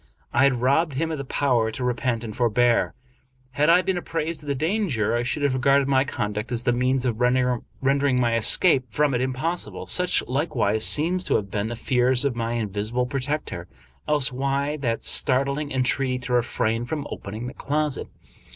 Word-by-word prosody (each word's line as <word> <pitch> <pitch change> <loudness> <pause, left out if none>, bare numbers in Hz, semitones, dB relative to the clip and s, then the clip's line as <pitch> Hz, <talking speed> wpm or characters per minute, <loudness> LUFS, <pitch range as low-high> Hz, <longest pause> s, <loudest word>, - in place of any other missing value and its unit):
I 130 - +4
had 130 -3 +1
robbed 140 +4 +2
him 160 +5 -1
of 155 - -3
the - - -3
power 125 -4 +1
to 120 +3 -5
repent 120 -1 -1
and 110 -2 -6
forbear. 120 0 +2 0.6
Had 145 +5 +2
I 180 +2 +5
been 190 -1 -1
apprised 165 -2 -4
of 150 - -13
the 140 - 0
danger, 150 - 0
I 120 - +1
should 140 +4 -2
have 140 -2 +2
regarded 135 +1 +3
my 135 0 +3
conduct 105 -2 -4
as 120 -1 -1
the 120 - +2
means 130 +1 0
of 120 -1 -2
render 125 0 +2 0.5
ing 125 -2 +2
my 120 -2 +2
escape 130 +4 +4
from 145 +4 +1
it 120 - 0
impossible. 130 +7 -2
Such, 180 0 +1
likewise, 125 -6 0
seem 170 +5 +1
to 180 - 0
have 100 -2 -2
been 105 +1 -1
the 120 - -4
fears 125 +2 +2
of 135 -4 0
my 115 0 -2
invisible 110 +2 -2
protector. 135 - -3 0.4
Else 145 -4 +2
why 140 +3 -1
that 120 -5 -2
startling 140 +3 +1
entreaty 130 0 0
to 125 - -3
refrain 120 -1 0
from 145 +2 -4
opening 110 +4 -6
the 125 - -6
closet? 150 0 -2
130 Hz, 190 wpm, -24 LUFS, 120-145 Hz, 0.6 s, I